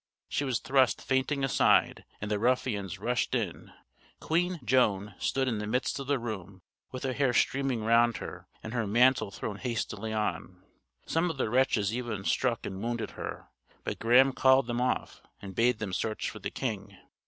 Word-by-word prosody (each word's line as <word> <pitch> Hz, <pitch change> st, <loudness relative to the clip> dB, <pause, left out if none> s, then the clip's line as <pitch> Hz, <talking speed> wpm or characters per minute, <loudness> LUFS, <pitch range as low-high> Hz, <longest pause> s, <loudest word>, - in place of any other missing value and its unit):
She -, -, -1 dB
was 130 Hz, -4 st, 0 dB
thrust 130 Hz, 0 st, +2 dB
fainting 135 Hz, +1 st, 0 dB
aside, 135 Hz, -, +3 dB
and 105 Hz, +1 st, -5 dB
the 105 Hz, -, +1 dB
ruffians 110 Hz, -5 st, 0 dB
rushed 120 Hz, +4 st, -1 dB
in. -, -, -3 dB, 0.5 s
Queen 175 Hz, +2 st, 0 dB
Joan 105 Hz, -4 st, +2 dB
stood 135 Hz, -1 st, 0 dB
in 115 Hz, -4 st, -1 dB
the 105 Hz, -, -4 dB
midst 125 Hz, +5 st, -1 dB
of 135 Hz, -, -6 dB
the 145 Hz, -1 st, +2 dB
room, 100 Hz, -6 st, -6 dB, 0.3 s
with 130 Hz, -, -6 dB
her 130 Hz, -1 st, -1 dB
hair 135 Hz, -2 st, +1 dB
streaming 135 Hz, -4 st, +1 dB
round 115 Hz, +1 st, +4 dB
her, -, -, -8 dB, 0.2 s
and 110 Hz, -, -6 dB
her 115 Hz, -3 st, -1 dB
mantle 120 Hz, 0 st, +4 dB
thrown 100 Hz, +1 st, -5 dB
hastily 110 Hz, -2 st, -3 dB
on. 95 Hz, -4 st, -3 dB, 0.4 s
Some 165 Hz, +2 st, +1 dB
of 160 Hz, -, -4 dB
the 115 Hz, -, -1 dB
wretches 115 Hz, -5 st, +2 dB
even 120 Hz, -5 st, -4 dB
struck 120 Hz, -3 st, 0 dB
and 95 Hz, 0 st, -5 dB
wounded 120 Hz, 0 st, -3 dB
her, -, -, -7 dB, 0.3 s
but -, -, -4 dB
Graham 130 Hz, +4 st, +5 dB
called 130 Hz, 0 st, +4 dB
them 120 Hz, 0 st, -2 dB
off, 125 Hz, -, -1 dB, 0.2 s
and 95 Hz, -1 st, -8 dB
bade 120 Hz, +4 st, +2 dB
them 105 Hz, -4 st, -5 dB
search 110 Hz, +3 st, -2 dB
for -, -, -10 dB
the -, -, -4 dB
king. 100 Hz, -6 st, -4 dB
120 Hz, 180 wpm, -29 LUFS, 105-130 Hz, 0.5 s, Graham